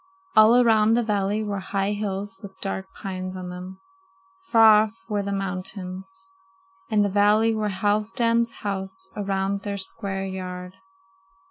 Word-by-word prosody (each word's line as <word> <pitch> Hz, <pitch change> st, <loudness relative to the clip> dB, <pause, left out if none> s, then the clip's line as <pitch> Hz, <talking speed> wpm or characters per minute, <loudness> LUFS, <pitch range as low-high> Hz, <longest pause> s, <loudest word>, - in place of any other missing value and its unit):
All 215 Hz, +2 st, +7 dB
around 225 Hz, -2 st, +4 dB
the 240 Hz, -, +2 dB
valley 205 Hz, 0 st, 0 dB
were 205 Hz, -2 st, -3 dB
high 195 Hz, +1 st, -1 dB
hills 200 Hz, -1 st, -4 dB
with 190 Hz, -2 st, -11 dB
dark 190 Hz, -1 st, -4 dB
pines 185 Hz, -2 st, -6 dB
on 185 Hz, -1 st, -6 dB
them. 180 Hz, +1 st, -8 dB, 0.7 s
Far 220 Hz, -, +7 dB
off 220 Hz, +1 st, -11 dB
were 210 Hz, -2 st, -1 dB
the 200 Hz, 0 st, -3 dB
mountains. 190 Hz, -, -5 dB, 0.6 s
In 210 Hz, -2 st, +3 dB
the -, -, +2 dB
valley 210 Hz, +3 st, +4 dB
were 215 Hz, -1 st, -1 dB
Halfdan's 225 Hz, +4 st, +1 dB
houses 190 Hz, -1 st, -3 dB
around 195 Hz, -1 st, -1 dB
their 200 Hz, -1 st, -4 dB
square 195 Hz, 0 st, -4 dB
yard. 180 Hz, -1 st, -6 dB
200 Hz, 140 wpm, -24 LUFS, 190-215 Hz, 0.7 s, All